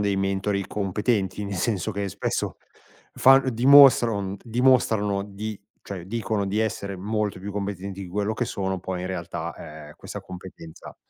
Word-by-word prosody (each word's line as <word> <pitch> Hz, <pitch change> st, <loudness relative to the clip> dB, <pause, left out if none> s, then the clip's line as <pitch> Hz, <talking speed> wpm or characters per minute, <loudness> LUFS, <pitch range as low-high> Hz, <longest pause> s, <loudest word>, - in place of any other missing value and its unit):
dei 100 Hz, -1 st, +1 dB
mentori 95 Hz, 0 st, -1 dB
competenti, 105 Hz, 0 st, -1 dB
nel 100 Hz, -1 st, -4 dB
senso 100 Hz, +1 st, -1 dB
che 100 Hz, -1 st, -3 dB
spesso, -, -, -3 dB, 0.6 s
fan 135 Hz, 0 st, +5 dB
dimostrano, 125 Hz, -3 st, +7 dB
mhmm, 95 Hz, 0 st, -4 dB
dimostrano 115 Hz, -5 st, +2 dB
di 105 Hz, +1 st, -6 dB, 0.2 s
cioè, 95 Hz, -4 st, -7 dB
dicono 105 Hz, 0 st, -2 dB
di 105 Hz, +3 st, 0 dB
essere 100 Hz, -2 st, -2 dB
molto 105 Hz, 0 st, -2 dB
più 100 Hz, +2 st, -6 dB
competenti 100 Hz, -1 st, -5 dB
di 95 Hz, -, -8 dB
quello 105 Hz, +4 st, -1 dB
che 120 Hz, -, -1 dB
sono, 95 Hz, -4 st, -3 dB
poi 90 Hz, 0 st, -4 dB
in 90 Hz, -, -4 dB
realtà, 85 Hz, -4 st, -6 dB
ehm, -, -, -12 dB
questa -, -, -8 dB
competenza 90 Hz, -3 st, -11 dB
100 Hz, 155 wpm, -25 LUFS, 95-110 Hz, 0.6 s, dimostrano